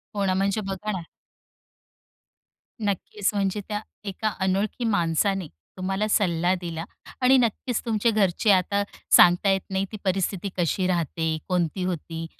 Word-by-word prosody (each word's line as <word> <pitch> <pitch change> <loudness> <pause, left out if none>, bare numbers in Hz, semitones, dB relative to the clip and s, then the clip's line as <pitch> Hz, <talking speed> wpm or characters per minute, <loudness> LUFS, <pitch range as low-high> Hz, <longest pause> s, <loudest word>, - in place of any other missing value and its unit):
हो 200 -1 0
ना. 190 - +2
म्हणजे 195 +3 +1
बघा 195 +2 -4
ना 185 -4 -4 1.8
नक्कीचं. 205 0 -1
म्हणजे 195 +1 0
त्या 210 -1 -2 0.2
एका 210 +2 -2
अनोळखी 195 +5 0
माणसाने 190 -1 +1 0.3
तुम्हाला 195 +3 -1
सल्ला 180 -4 +2
दिला 165 -2 -4 0.4
आणि 260 +1 +6
नक्कीचं 240 0 0
तुमच्या 225 0 +2
घरचे 205 0 +2
आता 200 +2 +2 0.3
सांगता 175 +3 +6
येत 195 -1 +1
नाही 190 0 0
ती 215 - -6
परिस्थिती 195 0 -1
कशी 180 +2 +1
राहते? 165 -2 -1
कोणती 180 0 0
होती? 165 -2 -4
195 Hz, 135 wpm, -25 LUFS, 180-210 Hz, 1.8 s, आणि